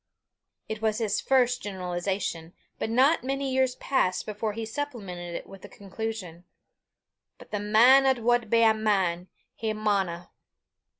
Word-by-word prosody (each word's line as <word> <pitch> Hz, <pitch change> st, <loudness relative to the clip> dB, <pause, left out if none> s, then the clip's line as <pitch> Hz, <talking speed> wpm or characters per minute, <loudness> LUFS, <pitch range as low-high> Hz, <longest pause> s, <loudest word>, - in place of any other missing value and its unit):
It 220 Hz, 0 st, -5 dB
was 215 Hz, -1 st, +1 dB
his 220 Hz, -3 st, -1 dB
first 250 Hz, -2 st, +2 dB
generalization, 180 Hz, -3 st, -4 dB, 0.3 s
but -, -, -2 dB
not 260 Hz, +6 st, +3 dB
many 270 Hz, 0 st, -2 dB
years 260 Hz, -1 st, +2 dB
passed 260 Hz, -9 st, 0 dB
before 215 Hz, 0 st, -3 dB
he 225 Hz, +1 st, -4 dB
supplemented 205 Hz, -10 st, -5 dB
it -, -, -6 dB
with 195 Hz, -1 st, -13 dB
a 205 Hz, -, -10 dB
conclusion: 200 Hz, -4 st, -6 dB, 0.9 s
"But -, -, -16 dB
the 210 Hz, -, -2 dB
man 240 Hz, +6 st, +6 dB
'at 265 Hz, -1 st, +3 dB
wad 240 Hz, -1 st, +2 dB
be 230 Hz, +1 st, +4 dB
a 220 Hz, -1 st, +6 dB
man, 190 Hz, -5 st, 0 dB, 0.3 s
he 220 Hz, -1 st, -3 dB
maunna." 195 Hz, -5 st, -1 dB
215 Hz, 145 wpm, -27 LUFS, 190-245 Hz, 0.9 s, man